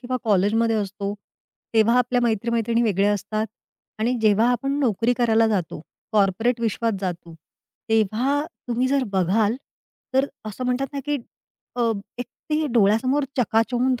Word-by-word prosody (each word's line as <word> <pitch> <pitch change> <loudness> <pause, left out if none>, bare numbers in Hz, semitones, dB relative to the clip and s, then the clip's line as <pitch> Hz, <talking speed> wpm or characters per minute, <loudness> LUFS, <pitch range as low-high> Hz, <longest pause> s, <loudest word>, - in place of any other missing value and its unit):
किंवा 255 0 -2
कॉलेजमध्ये 220 +2 +2
असतो, 200 -1 -3 0.6
तेव्हा 225 +2 +4
आपल्या 250 0 +1
मैत्री-मैत्रिणी 230 +1 +1
वेगळ्या 205 -2 +2
असतात 215 +2 -2 0.5
आणि 230 +3 +1
जेव्हा 215 +2 +4
आपण 275 +4 -1
नोकरी 235 -2 +2
करायला 225 -2 +3
जातो, 185 -8 -2 0.3
कॉर्पोरेट 215 +4 +2
विश्वात 230 0 0
जातो, 175 -3 -5 0.5
तेव्हा 225 +6 +1 0.3
तुम्ही 245 +2 +1
जर 275 -1 +1
बघाल, 205 +5 +2 0.6
तर 265 +1 +3 0.2
असं 215 +4 -5
म्हणतात 250 +2 0
ना, 280 - -3
की 295 - +1 0.6
अ, 235 -2 +2 0.3
एक 245 - -4 0.2
ते 305 0 +1
डोळ्यासमोर 240 +6 +3
चकाचौंध 245 +1 +1
230 Hz, 135 wpm, -23 LUFS, 210-250 Hz, 0.6 s, तेव्हा